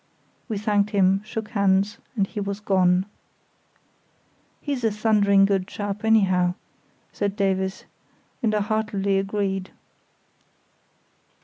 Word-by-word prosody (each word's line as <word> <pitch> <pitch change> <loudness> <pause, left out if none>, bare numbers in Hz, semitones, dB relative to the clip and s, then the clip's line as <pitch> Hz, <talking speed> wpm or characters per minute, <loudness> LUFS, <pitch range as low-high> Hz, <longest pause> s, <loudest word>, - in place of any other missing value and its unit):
We 215 - -2
thanked 205 0 +1
him, 195 -2 +3
shook 220 0 -6
hands, 200 -1 +1 0.2
and 200 -4 +2
he 210 - -7
was 200 0 -3
gone. 185 -2 +2 1.5
"He's 280 -4 -4
a 225 - +3
thundering 205 -2 +3
good 195 -2 0
chap, 205 0 -5
anyhow," 185 -5 +3 0.6
said 205 -1 -2
Davies; 190 -1 -1 0.6
and 215 -2 +1
I 210 - +1
heartily 200 -2 0
agreed. 195 -1 -2
200 Hz, 110 wpm, -24 LUFS, 195-210 Hz, 1.5 s, him